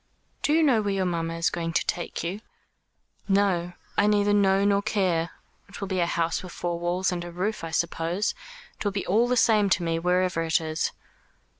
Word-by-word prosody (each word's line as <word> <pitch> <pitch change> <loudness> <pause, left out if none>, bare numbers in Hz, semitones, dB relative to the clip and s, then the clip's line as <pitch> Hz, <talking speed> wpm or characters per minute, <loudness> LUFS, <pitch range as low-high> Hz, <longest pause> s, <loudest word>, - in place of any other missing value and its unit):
"Do - - +1
you 325 +1 +4
know 255 -7 +4
where 200 -1 -1
your 190 -1 0
mamma 165 -2 -2
is 165 +1 +1
going 165 -1 -3
to - - +1
take 175 - -3
you?" 185 +5 -4 0.9
"No; 195 -3 +1 0.3
I 205 - +4
neither 205 -1 +3
know 195 -1 +3
nor 200 0 +3
care. 185 -6 0 0.4
It 200 - -10
will 200 - -4
be 190 -1 -2
to - - +2
a - - +3
house 165 -1 0
with 180 - -9
four 175 -1 -3
walls 180 +2 0
and 175 -1 -3
a 175 - -7
roof, 185 +5 -3
I 165 - -4
suppose. 170 +4 -1 0.5
It - - -4
will 205 - 0
be 195 0 -3
all 225 +6 +3
the 250 0 +1
same 210 -4 +4
to 185 - +2
me 165 -1 0
wherever 180 0 +1
it 160 -1 +2
is." 160 -1 -2
185 Hz, 215 wpm, -26 LUFS, 170-205 Hz, 0.9 s, you